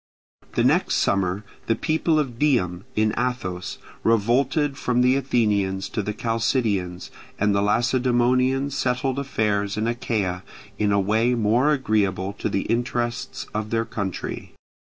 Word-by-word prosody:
The - - +1
next - - +3
summer 95 +1 +1 0.2
the 115 - +2
people 160 +2 +1
of 130 -6 -2
Dium, 100 -11 +1
in 110 0 +2
Athos, 95 -8 -3 0.3
revolted 130 +6 +2
from 125 -3 0
the 125 +1 +4
Athenians 105 -8 +1
to - - -2
the 105 - -3
Chalcidians, 110 -5 -1 0.3
and 105 0 +2
the 100 - +2
Lacedaemonians 125 +4 +2
settled 130 +1 0
affairs 105 -6 -1
in 110 - 0
Achaea 105 -6 -1 0.4
in 105 -1 +2
a 100 - +3
way 110 +5 +2
more 120 +6 +3
agreeable 100 -8 0
to - - -1
the 95 - 0
interests 120 0 -2
of 105 0 -3
their 115 0 0
country. 100 -5 -5
115 Hz, 135 wpm, -23 LUFS, 100-125 Hz, 0.4 s, the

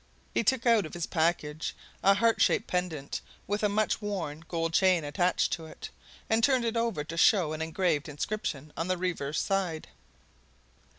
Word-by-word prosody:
He - - +1
took 250 +2 +1
out 225 -7 +4
of - - -10
his 170 -1 -2
package 160 -2 -1 0.3
a 195 +1 +5
heart 230 +2 +2
shaped 220 - +3
pendant, 175 -6 -3 0.2
with 205 +1 -1
a 210 - +2
much 215 +2 0
worn 170 -7 -4
gold 165 -1 -2
chain 185 -2 +4
attached 175 +5 +1
to 165 -2 -4
it, - - -9 0.4
and 225 +1 +2
turned 260 -2 +3
it 230 0 -1
over 230 -9 0
to 165 +2 -7
show 170 -3 +4
an 155 - -4
engraved 160 -2 0
inscription 150 -2 -4
on 165 - -2
the 185 0 0
reverse 165 -5 -2
side. 185 -5 -1
180 Hz, 175 wpm, -29 LUFS, 160-205 Hz, 0.4 s, a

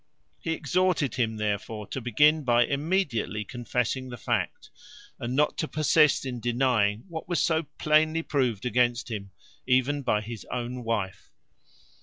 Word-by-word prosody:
He 165 - -2
exhorted 160 -3 +1
him, 110 -3 -1
therefore, 105 0 -3
to 135 - -4
begin 150 +7 +4
by 120 -2 +4
immediately 140 - -1
confessing 125 +2 -2
the 120 - -7
fact, - - -2 0.5
and 120 +2 -3
not 150 +2 +2
to 160 - 0
persist 155 -1 +3
in 125 -2 -4
denying 120 -3 +1
what 165 -1 -7
was 175 -4 +1
so 160 0 +1
plainly 155 +1 +3
proved 125 -9 0
against 120 0 +1
him 100 -3 -5 0.4
even 130 +3 +2
by 105 -5 +1
his 110 0 -7
own 125 0 -4
wife. 105 -5 -3
125 Hz, 145 wpm, -27 LUFS, 115-150 Hz, 0.5 s, begin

